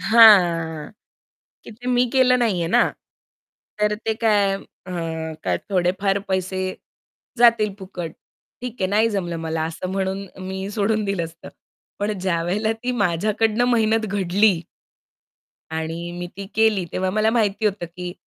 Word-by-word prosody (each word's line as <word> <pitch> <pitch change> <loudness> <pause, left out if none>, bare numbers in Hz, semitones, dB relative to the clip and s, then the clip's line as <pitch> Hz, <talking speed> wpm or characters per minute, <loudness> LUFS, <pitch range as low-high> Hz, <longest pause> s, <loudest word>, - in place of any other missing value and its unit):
हां, 175 -9 +5 0.7
की - - -10
ते 240 +3 -12
मी 250 0 +3
केलं 255 -1 +4
नाही 220 -6 +1
आहे 165 - -1
ना. - - +5 1.0
तर 210 0 +2
ते 220 +1 -2
काय 205 -3 +2
अ, 185 -1 -11 0.5
काय - - +1
थोडेफार 195 +2 +1
पैसे 190 0 -1 0.8
जातील 230 -4 +4
फुकट. 180 -4 -6 0.5
ठीक 250 -1 -5
आहे, 190 - +2
नाही 220 +2 +3
जमलं 175 -5 -2
मला 160 -1 -2
असं 165 +3 -5
म्हणून 195 0 -2 0.2
मी 190 +1 -4
सोडून 215 0 0
दिलं 195 -4 -1
असतं. 165 +1 -11 0.5
पण 210 +1 0
ज्यावेळेला 185 +4 0
ती 250 - 0
माझ्याकडून 215 +3 +1
मेहनत 225 -1 +2
घडली 195 -1 +2 1.1
आणि 165 +2 -4
मी 175 - -4
ती 200 0 -6
केली, 220 -4 +3
तेव्हा 185 0 0
मला 215 +3 +2
माहिती 220 -2 +1
होतं, 195 -4 -1
की 175 +1 -7
195 Hz, 140 wpm, -22 LUFS, 175-220 Hz, 1.1 s, हां